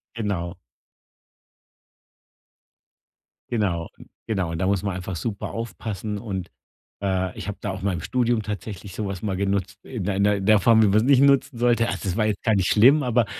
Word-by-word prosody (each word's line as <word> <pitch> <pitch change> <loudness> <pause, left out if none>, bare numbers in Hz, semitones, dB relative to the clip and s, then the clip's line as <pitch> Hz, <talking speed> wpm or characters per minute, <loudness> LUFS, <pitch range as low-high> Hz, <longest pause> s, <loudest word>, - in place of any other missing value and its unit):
Genau. 95 -5 -3 2.9
Genau. 95 -8 -1 0.4
Genau, 95 -7 -1
und 80 - -4
da 95 - +1
muss 100 -1 +1
man 100 -3 -2
einfach 95 0 -5
super 100 +2 -4
aufpassen 110 -2 -5
und, 95 -5 -5 0.5
äh, 95 -2 -1
ich - - -6
habe 105 - -4
da 100 - -2
auch 95 0 -6
mal 100 -1 0
im 80 - -4
Studium 120 -1 0
tatsächlich 100 -1 -6
so 105 -2 -3
was 95 -1 -5
mal 100 -3 -1
genutzt 100 +1 -1
in 120 -8 -5
der 95 0 -1 0.2
in 95 -1 -4
der 110 -1 +6
Form, 110 +1 +5
wie - - +5
man's 105 +2 +4
nicht 135 0 +5
nutzen 140 -3 +3
sollte. 120 -1 +2
Also, - - -3
das 95 -2 -2
war 110 -1 +2
jetzt 105 -2 -2
gar 110 - +3
nicht 95 -2 +2
schlimm, 130 +8 +6
aber 120 -2 +2
100 Hz, 190 wpm, -24 LUFS, 95-115 Hz, 2.9 s, der